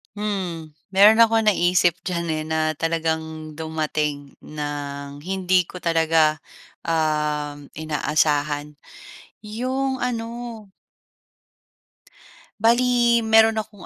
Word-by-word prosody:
Hmm, 185 Hz, -6 st, -4 dB, 0.2 s
meron 210 Hz, +4 st, +7 dB
akong 225 Hz, -1 st, +5 dB
naisip 175 Hz, -2 st, +2 dB
diyan 170 Hz, -2 st, -2 dB
eh, 155 Hz, 0 st, -2 dB
na 160 Hz, 0 st, -1 dB, 0.2 s
talagang 160 Hz, -1 st, -2 dB
dumating 155 Hz, -3 st, -3 dB
ng 145 Hz, -1 st, -6 dB
hindi 185 Hz, +2 st, +1 dB
ko 180 Hz, -, -10 dB
talaga 160 Hz, -2 st, +2 dB, 0.5 s
uhm, 150 Hz, -2 st, -1 dB
inaasahan. 150 Hz, -1 st, -1 dB, 0.7 s
'Yong 260 Hz, +5 st, -2 dB
ano. 230 Hz, -2 st, -2 dB, 2.3 s
Bale, 240 Hz, +1 st, +3 dB
meron 220 Hz, 0 st, +4 dB
akong 210 Hz, -3 st, -14 dB
165 Hz, 85 wpm, -22 LUFS, 150-210 Hz, 2.3 s, meron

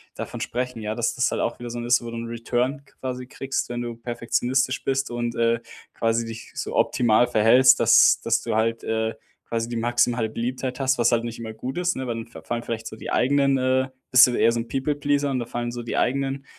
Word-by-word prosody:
davon -, -, -6 dB
sprechen, 125 Hz, -1 st, -3 dB
ja, 105 Hz, 0 st, -2 dB
dass 120 Hz, 0 st, -1 dB
das 125 Hz, -, +1 dB
halt -, -, -1 dB
auch -, -, -1 dB
wieder 120 Hz, -1 st, -6 dB
so 120 Hz, -, -5 dB
'n 120 Hz, -, -5 dB
ist, 120 Hz, 0 st, +3 dB
wo 115 Hz, -, -6 dB
du 115 Hz, -, -6 dB
'n 115 Hz, 0 st, -5 dB
Return 120 Hz, +4 st, -2 dB
quasi 125 Hz, -2 st, -6 dB
kriegst, 135 Hz, +1 st, -3 dB
wenn 120 Hz, 0 st, -3 dB
du 120 Hz, -1 st, -5 dB
perfektionistisch 120 Hz, +3 st, -1 dB
bist 135 Hz, 0 st, 0 dB
und, 120 Hz, -1 st, -3 dB
äh, 115 Hz, 0 st, +1 dB, 0.3 s
quasi 115 Hz, 0 st, 0 dB
dich 115 Hz, 0 st, -9 dB
so -, -, -4 dB
optimal 120 Hz, 0 st, +3 dB
verhältst, 125 Hz, +3 st, +5 dB
dass -, -, +6 dB
dass -, -, +1 dB
du -, -, -2 dB
halt, 115 Hz, +1 st, 0 dB
äh, 110 Hz, 0 st, -1 dB, 0.3 s
quasi 115 Hz, 0 st, -1 dB
die 120 Hz, -, -3 dB
maximale 120 Hz, 0 st, +1 dB
Beliebtheit 125 Hz, +3 st, -4 dB
hast, 135 Hz, -1 st, +1 dB
was 120 Hz, 0 st, +4 dB
halt 115 Hz, -1 st, +2 dB
nicht 115 Hz, 0 st, -6 dB
immer 110 Hz, -1 st, -6 dB
gut 125 Hz, +6 st, -6 dB
ist, 180 Hz, 0 st, 0 dB
ne, 130 Hz, -, -4 dB
weil 120 Hz, -, -2 dB
dann 115 Hz, +1 st, -6 dB
fa 115 Hz, -, -12 dB
fallen 120 Hz, 0 st, -3 dB
vielleicht 115 Hz, -1 st, -4 dB
so -, -, -7 dB
die -, -, -7 dB
eigenen, 140 Hz, +1 st, +3 dB
äh 130 Hz, 0 st, +1 dB, 0.2 s
bist 125 Hz, 0 st, +8 dB
du 125 Hz, -, -1 dB
eher -, -, +4 dB
so 115 Hz, -, -1 dB
'n 115 Hz, -, -5 dB
People 135 Hz, +4 st, -1 dB
Pleaser 145 Hz, 0 st, 0 dB
und 130 Hz, -, 0 dB
da 120 Hz, -, -3 dB
fallen 120 Hz, 0 st, -3 dB
so 120 Hz, 0 st, -5 dB
die 115 Hz, -, -4 dB
eigenen, 135 Hz, +1 st, 0 dB
120 Hz, 240 wpm, -24 LUFS, 115-130 Hz, 0.3 s, bist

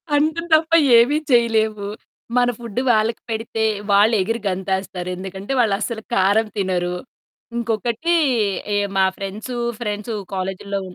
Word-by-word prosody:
అంతే 315 Hz, +3 st, +1 dB
తప్ప 320 Hz, +1 st, +4 dB, 0.3 s
ఏమి 265 Hz, +6 st, +4 dB
చేయలేము. 220 Hz, -3 st, +2 dB, 0.5 s
మన 245 Hz, 0 st, +4 dB
ఫుడ్డు 235 Hz, +1 st, -3 dB
వాళ్ళకి 220 Hz, +1 st, +1 dB
పెడితే, 225 Hz, 0 st, -2 dB, 0.3 s
వాళ్ళు 210 Hz, +3 st, +5 dB
ఎగిరి 225 Hz, +3 st, -2 dB
గంతేస్తారు 190 Hz, -1 st, -3 dB
ఎందుకంటే 190 Hz, +4 st, -7 dB
వాళ్ళస్సలు 220 Hz, +1 st, -1 dB
కారం 205 Hz, +4 st, +3 dB
తినరు. 180 Hz, -2 st, -1 dB, 0.6 s
ఇంకొకటి 235 Hz, +8 st, 0 dB, 0.6 s
ఎ -, -, +2 dB, 0.2 s
మా 190 Hz, -, +5 dB
ఫ్రెండ్సు, 210 Hz, +5 st, -5 dB, 0.2 s
ఫ్రెండ్సు 210 Hz, 0 st, -3 dB, 0.2 s
కాలేజీలో 195 Hz, +1 st, -3 dB
215 Hz, 115 wpm, -21 LUFS, 195-235 Hz, 0.6 s, వాళ్ళు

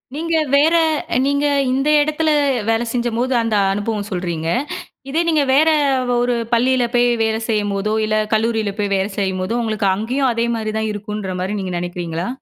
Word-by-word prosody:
நீங்க 330 Hz, +1 st, -1 dB, 0.2 s
வேற 305 Hz, +4 st, +4 dB, 0.5 s
நீங்க 285 Hz, +1 st, +1 dB, 0.3 s
இந்த 270 Hz, +3 st, 0 dB
எடத்தில, 305 Hz, +1 st, 0 dB, 0.4 s
வேல 225 Hz, +1 st, +2 dB
செஞ்சம்போது, 240 Hz, +1 st, -1 dB
அந்த 230 Hz, -2 st, 0 dB, 0.2 s
அனுபவம் 205 Hz, 0 st, -2 dB
சொல்றீங்க. 170 Hz, -3 st, -3 dB, 0.6 s
இதே 320 Hz, +4 st, +1 dB
நீங்க, 305 Hz, -3 st, +3 dB
வேற 310 Hz, +4 st, +5 dB, 0.5 s
ஒரு 245 Hz, 0 st, +1 dB, 0.2 s
பள்ளில 250 Hz, +1 st, +3 dB
போய், 245 Hz, 0 st, +4 dB, 0.2 s
வேல 220 Hz, 0 st, 0 dB
செய்யும்போதோ, 205 Hz, 0 st, 0 dB
இல்ல 215 Hz, 0 st, 0 dB, 0.2 s
கல்லூரியில 220 Hz, -2 st, 0 dB
போய் 200 Hz, -1 st, -1 dB
வேல 195 Hz, +2 st, 0 dB
செய்யும்போதோ, 190 Hz, +3 st, -1 dB
உங்களுக்கு 215 Hz, -2 st, -1 dB
அங்கேயும், 250 Hz, +5 st, 0 dB
அதே 230 Hz, +1 st, 0 dB
மாரி 215 Hz, -1 st, -3 dB
தான் 220 Hz, 0 st, -1 dB
இருக்குன்ற 205 Hz, -2 st, -5 dB
மாரி, 200 Hz, +3 st, -2 dB
நீங்க 185 Hz, -2 st, -4 dB
நெனக்கிறீங்களா? 175 Hz, -1 st, -4 dB
220 Hz, 155 wpm, -19 LUFS, 200-255 Hz, 0.6 s, வேற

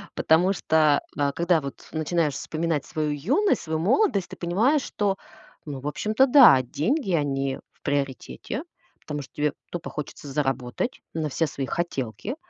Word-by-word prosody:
Потому 175 Hz, +5 st, +3 dB
что, 155 Hz, -5 st, +3 dB, 0.2 s
а, 145 Hz, -1 st, +1 dB
когда 170 Hz, +1 st, +2 dB
вот 140 Hz, -1 st, -8 dB
начинаешь 155 Hz, -1 st, 0 dB
вспоминать 160 Hz, -1 st, -2 dB
свою 155 Hz, -1 st, -2 dB
юность, 255 Hz, -, +1 dB
свою 160 Hz, -1 st, -2 dB
молодость, 205 Hz, -, +2 dB
ты -, -, -9 dB
понимаешь, 225 Hz, -, +2 dB
что, 200 Hz, -2 st, -1 dB, 0.5 s
ну, 145 Hz, -3 st, -5 dB
в 140 Hz, -, -5 dB
общем-то 215 Hz, -, +2 dB
да, 250 Hz, -, +8 dB
деньги, 195 Hz, -, -1 dB
они 135 Hz, -3 st, 0 dB
в -, -, -36 dB
приоритете. 140 Hz, -, -3 dB, 0.4 s
Потому 150 Hz, -1 st, -5 dB
что 135 Hz, -, -13 dB
тебе 150 Hz, -1 st, 0 dB, 0.2 s
тупо 175 Hz, 0 st, -5 dB
хочется 150 Hz, 0 st, -7 dB
заработать 135 Hz, -, -2 dB
на 155 Hz, -2 st, -2 dB
все 160 Hz, +4 st, 0 dB
свои 140 Hz, -2 st, -4 dB
хотелки. 170 Hz, -, -3 dB
155 Hz, 155 wpm, -25 LUFS, 140-190 Hz, 0.5 s, да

